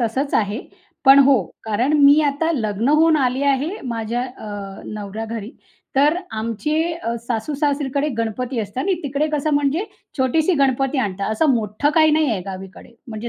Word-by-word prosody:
तसंच 260 +5 -1
आहे. 210 +2 0 0.4
पण 270 0 +8
हो. 265 -6 +4 0.2
कारण 225 +6 0
मी 285 +1 +7
आता 290 +3 0
लग्न 220 -4 -1
होऊन 315 +2 +4
आली 260 -1 0
आहे 280 +2 +1 0.2
माझ्या 230 +1 -2
अ, 250 -3 -8 0.4
नवऱ्या 210 +1 -6
घरी. 225 -1 -6 0.5
तर 295 +4 +4
आमचे 230 +8 -2
अ, 280 -9 -4
सासू-सासरीकडे 280 +3 -1
गणपती 235 +3 -2
असतात 210 +5 -4
आणि 385 0 +1
तिकडे 285 +1 -1
कसं 300 +1 0
म्हणजे 290 +7 +1 0.3
छोटीशी 305 +7 +2
गणपती 270 -1 +1
आणतात. 200 -3 -2
असं 290 +7 +2
मोठं 220 +5 0
काही 315 -1 +5
नाहीये 300 -10 +1
गावीकडे. 190 +4 -9
म्हणजे 220 +1 -5
260 Hz, 155 wpm, -20 LUFS, 220-290 Hz, 0.5 s, पण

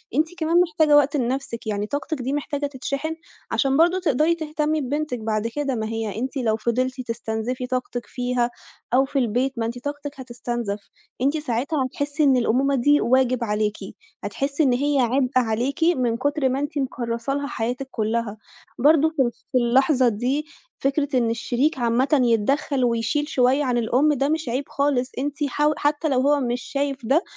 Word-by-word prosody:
أنتِ 310 +3 +3
كمان 335 +2 +3
محتاجة 315 -3 +3
وقت 290 +1 +3
لنفسِك، 250 -2 -3
يعني 210 0 -1
طاقتِك 290 +1 -3
دي 260 +3 -2
محتاجة 290 0 -2
تتشحن، 280 +3 -3 0.4
عشان 270 -1 +2
برضه 350 +3 +4
تقدري 315 0 +2
تهتمي 310 -1 -1
ببنتِك 285 -1 -2
بعد 215 0 -1
كده، 275 +2 -2
ما 220 -1 -2
هي 225 -2 -3
أنتِ 265 +3 -3
لو 225 -4 +1
فضلتِ 255 +3 -1
تستنزفي 235 +1 -3
طاقتِك 250 -1 -3
فيها 245 -1 -1 0.4
أو 265 +2 +5
في 275 +1 -1
البيت، 250 +2 0
ما 225 - 0
أنتِ 235 +2 -4
طاقتِك 290 -1 -5
هتُستنزَف، 240 -4 -4 0.4
أنتِ 280 +4 +2
ساعتها 270 +1 -1
هتحسّي 285 +3 -2
إن 270 -3 +5
الأمومة 260 +4 +2
دي 290 +4 +4
واجب 255 0 +2
عليكِ، 210 -1 -1 0.5
هتحسّي 275 +9 -1
إن 260 -4 +3
هي 285 +2 +1
عبء 255 +1 +2
عليكِ 250 +7 0
من 255 -9 +2
كتر 285 +1 +1
ما 265 +2 -1
أنتِ 290 +2 -3
مكرّسة 240 -2 -2
لها 285 0 -2
حياتِك 245 +3 -3
كلّها، 220 -1 -2 0.4
برضه 310 +4 +5
في 290 -4 +1 0.3
في 260 - +2
اللحظة 255 +1 +3
دي 255 +8 -1 0.4
فكرة 280 0 +1
إن 235 -2 +2
الشريك 245 +6 0
عامةً 250 +5 +2
يتدخل 255 +4 +1
ويشيل 235 +6 0
شوية 265 0 +2
عن 250 -3 0
الأم، 255 +6 +2
ده 275 0 0
مش 315 -5 -1
عيب 255 +4 -1
خالص، 275 -3 0
أنتِ 285 +2 -2
حاو 295 +3 +1
حتى 295 +2 0
لو 255 -2 +2
هو 290 +2 +3
مش 245 -2 -1
شايف 275 -3 -3
ده، 290 - +3
265 Hz, 175 wpm, -23 LUFS, 240-290 Hz, 0.5 s, أو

